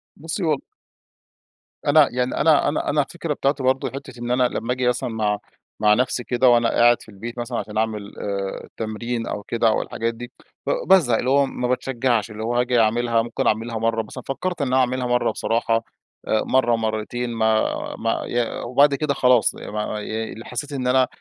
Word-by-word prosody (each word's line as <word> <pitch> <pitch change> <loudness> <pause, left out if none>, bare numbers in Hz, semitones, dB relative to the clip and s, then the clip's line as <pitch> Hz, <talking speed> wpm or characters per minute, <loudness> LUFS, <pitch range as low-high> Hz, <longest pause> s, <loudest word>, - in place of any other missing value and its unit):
بُصّي 165 +5 -4
والل 155 -4 +1 1.3
أنا 145 0 +6
يعني 125 +1 -1
أنا 155 -3 +5
-أنا 145 - -2
أنا 145 +1 +3
الفكرة 160 +2 -4
بتاعتي 140 -1 -1
برضه 130 +1 +1
حتة 130 -3 -9
إن 120 0 -3
أنا 125 +1 +3
لما 120 0 -2
آجي 125 -1 -1
مثلًا 125 0 0
مع 105 -2 -1 0.4
مع 105 0 +5
نفسي 125 +1 0
كده 125 +1 +3
وأنا 120 -1 +4
قاعد 120 0 +4
في - - -14
البيت 115 +4 -8
مثلًا 120 0 -3
عشان 105 0 -5
أعمل 110 -2 -2
آآ، 100 -1 -3
التمرين 115 +2 -4
أو 105 - -4
كده 115 +2 0
أو 110 - +2
الحاجات 115 +1 -3
دي، 120 +1 -9 0.4
ب - - +1 0.2
بازهق، 145 -12 +5
اللي 125 - -1
هو 140 +1 +4
ما 125 -2 -3
باتشجَّعش. 125 -3 0
اللي 110 +1 -6
هو 120 +2 -1
هاجي 125 0 +2
أعملها 115 +1 +2
ممكن 115 0 -2
أعملها 115 +1 0
مرة 115 0 0
مثلًا، 120 +4 -9
فكرت 175 +5 -3
إن 140 - +1
أنا 130 +1 +2
أعملها 130 0 +1
مرة 120 -2 +2
بصراحة، 115 +1 0 0.4
مرة 120 +2 +2
مرتين، 110 +2 -2
ما 110 -1 +2 0.4
ما - - 0
ي 120 -1 -1
وبعد 140 +4 +4
كده 145 0 0
خلاص 125 -3 +3
ما - - -8
ما 105 - -4
ي 110 +1 -5
حسيت 145 +4 -5
إن 130 -2 -2
أنا 130 0 +4
120 Hz, 190 wpm, -22 LUFS, 115-130 Hz, 1.3 s, أنا